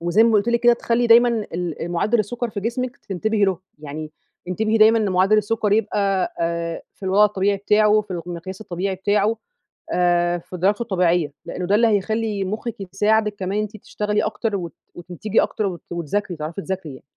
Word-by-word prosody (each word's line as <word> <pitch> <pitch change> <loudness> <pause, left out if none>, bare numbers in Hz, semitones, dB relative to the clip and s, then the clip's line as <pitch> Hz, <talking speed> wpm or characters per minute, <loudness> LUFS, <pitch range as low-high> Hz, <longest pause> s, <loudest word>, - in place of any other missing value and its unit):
وزي 175 +6 +3
ما 230 - +4
قُلت 210 +2 +2
لِك 235 0 +2
كده، 240 0 +6
تخلّي 235 0 0
دايمًا 235 +1 +7 0.3
ال 175 -1 -3
مُعدّل 215 +7 +1
السكر 235 +3 -2
في 200 - -4
جسمِك 250 +4 -3
تنتبهي 210 0 -1
له. 190 -3 0 0.2
يعني 155 +1 -7 0.4
انتبهي 220 +4 0
دايمًا 220 +1 +6
لمُعدّل 195 0 +3
السكر 210 0 0
يبقى 200 -3 +1
آآ 170 0 -2
في - - -30
الوضع 195 +2 +4
الطبيعي 200 -1 +1
بتاعه، 210 +1 +3
في 210 - -14
الق 175 0 -6
المقياس 180 +3 -7
الطبيعي 190 -1 -3
بتاعه. 205 +3 +1 0.6
آآ 175 0 +2
في 180 +2 -9
درجته 200 +5 +1
الطبيعية، 175 -8 +1
لإنه 180 - -4
ده 200 - +3
اللي 230 +2 +4
هيخلّي 215 0 0
مُخِّك 215 +4 -4 0.2
يساعدِك 210 +1 +2
كمان 195 0 -3
إن 210 - +2
أنتِ 215 0 -7
تشتغلي 210 0 -2
أكتر، 210 0 -2
وت 175 -3 -4 0.2
وتنتجي 180 +5 -1
أكتر، 215 - -1
وت 175 -3 -5
وتذاكري، 175 +3 -2
وتعرفي 160 +5 -5
تذاكري 190 -4 -4
يعني. - - -15
200 Hz, 185 wpm, -22 LUFS, 180-215 Hz, 0.6 s, دايمًا